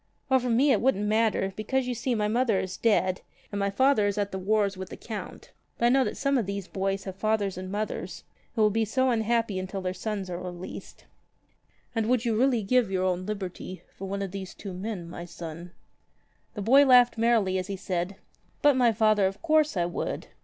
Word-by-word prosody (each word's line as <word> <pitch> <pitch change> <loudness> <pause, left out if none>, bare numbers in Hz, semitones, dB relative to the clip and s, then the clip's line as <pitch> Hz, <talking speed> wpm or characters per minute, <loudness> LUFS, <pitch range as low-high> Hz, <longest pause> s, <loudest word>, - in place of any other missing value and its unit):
"O 260 - +6
for 250 0 -3
me 260 +5 +4
it 225 - +3
wouldn't 225 -5 +2
matter, 215 -2 +1
because, 260 +5 -1
you 250 - -2
see, 240 +1 -1
my 210 -1 +1
mother 230 -2 +2
is 185 0 -4
dead, 190 -5 +1 0.3
and 205 - -3
my 200 0 +1
father 215 +1 +3
is 200 - -2
at 205 -1 -1
the 190 - -4
wars 200 +1 +1
with 190 0 -7
the - - -8
Count. 220 -3 -8 0.3
But 235 - +1
I - - +6
know 265 +1 +4
that 210 - -3
some 275 -1 +2
of 215 - -2
these 200 -1 -4
boys 195 0 -2
have 190 -1 -6
fathers 205 -1 0
and 185 +1 -6
mothers 195 -4 -4 0.3
who 220 - +3
will 210 - +4
be 225 +2 +1
so 260 +4 +1
unhappy 225 -3 +1
until 190 +1 -4
their 185 -1 -2
sons 200 0 -4
are 175 0 -5
released." 180 0 -8 0.9
"And 225 -2 0
would 250 -1 +2
you 230 -2 +1
really 245 -1 +2
give 245 +1 +2
your 185 -1 0
own 185 0 -1
liberty 185 -2 -6
for 195 - -7
one 200 +1 -3
of 195 - -5
these 190 -1 -7
two 195 -2 -7
men, 185 -2 -5
my 175 0 -7
son?" 170 0 -8 0.9
The 205 - -4
boy 270 +7 +7
laughed 245 -3 +5
merrily 220 -5 +2
as 185 - -4
he 200 -1 -4
said: 180 0 -3 0.5
"But, 290 -2 +6
my 245 -2 +4
father, 215 -2 +3
of 195 +7 -7
course 310 - +3
I 175 - +2
would. 175 - -4
210 Hz, 220 wpm, -27 LUFS, 190-235 Hz, 0.9 s, boy